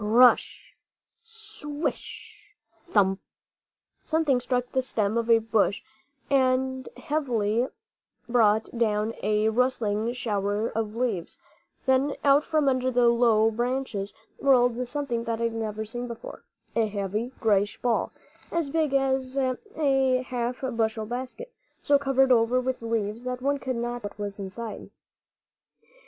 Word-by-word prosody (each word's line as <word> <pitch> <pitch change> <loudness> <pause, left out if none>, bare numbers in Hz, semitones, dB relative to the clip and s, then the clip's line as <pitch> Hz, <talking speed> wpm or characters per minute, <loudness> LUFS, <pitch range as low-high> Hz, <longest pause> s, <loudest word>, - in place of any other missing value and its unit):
Pr 210 - -3
r - - -2
r 250 +2 +10
r - - +6
ush, - - -10 0.5
swish! 415 0 -6 0.3
thump! 195 - +2 0.8
Something 315 -5 +1
struck 245 0 -1
the 260 - +1
stem 215 -4 -1
of 235 0 -1
a 230 - +7
bush 220 -2 +1 0.5
heavily 260 -3 0
and 255 - -1 0.6
brought 220 -2 +2
down 220 -1 +1
a 210 +1 +2
rustling 230 -2 +1
shower 210 -2 -1
of 220 -1 -3
leaves; 230 -8 -2 0.5
then 265 +2 +2
out 285 +1 +5
from 310 -3 +1
under 255 -1 +2
the 245 -1 +4
low 230 -2 +4
branches 240 -3 -2 0.2
rolled 250 -2 +3
something 245 -4 -2
that 230 -1 -2
I - - -1
had 230 -1 0
never 220 -1 -3
seen 240 +3 -5
before, 235 -1 -9 0.3
a 225 -1 +2
heavy, 210 +3 -3
grayish 205 -2 +1
ball, 240 -2 0 0.4
as 330 -5 -1
big 310 -3 +1
as 265 -1 0
a 270 -2 +1
half 245 -1 -3
bushel 225 -4 -1
basket, 255 - -6 0.3
so 285 -1 +4
covered 270 -1 +3
over 240 +1 +4
with 255 0 -2
leaves 225 0 -2
that 250 0 -3
one 280 +2 0
could 260 -2 -3
not 240 +1 -3
tell 205 - -4
what - - -21
was 205 0 -5
inside. 210 +3 -6
245 Hz, 145 wpm, -26 LUFS, 220-265 Hz, 0.8 s, r